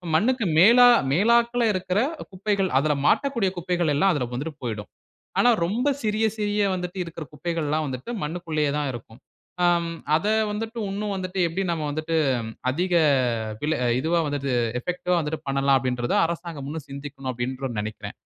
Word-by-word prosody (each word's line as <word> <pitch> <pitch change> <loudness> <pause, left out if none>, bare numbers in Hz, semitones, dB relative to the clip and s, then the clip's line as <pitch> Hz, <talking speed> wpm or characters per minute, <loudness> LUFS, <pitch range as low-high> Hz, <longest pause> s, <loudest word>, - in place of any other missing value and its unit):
மண்ணுக்கு 230 +5 +2
மேலா 240 +6 +8 0.2
மேலாக்கில 235 +6 +3
இருக்குற 185 +2 0 0.3
குப்பைகள், 195 0 0
அதில 150 +1 +1
மாட்டக்கூடிய 235 -9 +2
குப்பைகள், 175 -2 0
எல்லாம் 195 +6 +4
அதில 125 -4 -1
வந்துட்டு 145 +3 -4
போய்டும். 110 -4 -4 0.5
ஆனா, 245 - +5 0.2
ரொம்ப 230 +10 -1 0.2
சிறிய 215 +1 +1
சிறிய 210 0 0
வந்துட்டு 180 +1 -5
இருக்குற 165 -1 -7
குப்பைகள்லாம் 155 -1 -1
வந்துட்டு, 130 - -6
மண்ணுக்குள்ளேயே 155 -2 -1
தான் 145 -2 -1
இருக்கும். 115 0 -10 0.4
ஆ - - +5 0.5
அதை 200 +7 +1 0.2
வந்துட்டு, 225 +3 -5
இன்னும் 205 +1 -3
வந்துட்டு, 185 0 -4
எப்படி 185 +4 -2
நம்ம 160 -2 -2
வந்துட்டு, 155 +2 -2 0.6
அதிக 175 +5 -1 0.5
அ 110 - -5
விலை 155 +1 +1 0.2
இதுவா 165 +4 +1
வந்துட்டு, 140 -2 -2 0.3
எஃபெக்டிவா 180 +3 -1
வந்துட்டு 150 0 -3
பண்ணலாம். 135 0 +3
அப்படின்றத 125 -2 -1
அரசாங்கம் 165 -4 -5
இன்னும் 155 -2 -6
சிந்திக்கனும். 140 -1 -6
அப்படின்ற 130 +2 -4
நெனைக்கிறேன். 110 +1 -6
165 Hz, 150 wpm, -24 LUFS, 140-195 Hz, 0.6 s, மேலா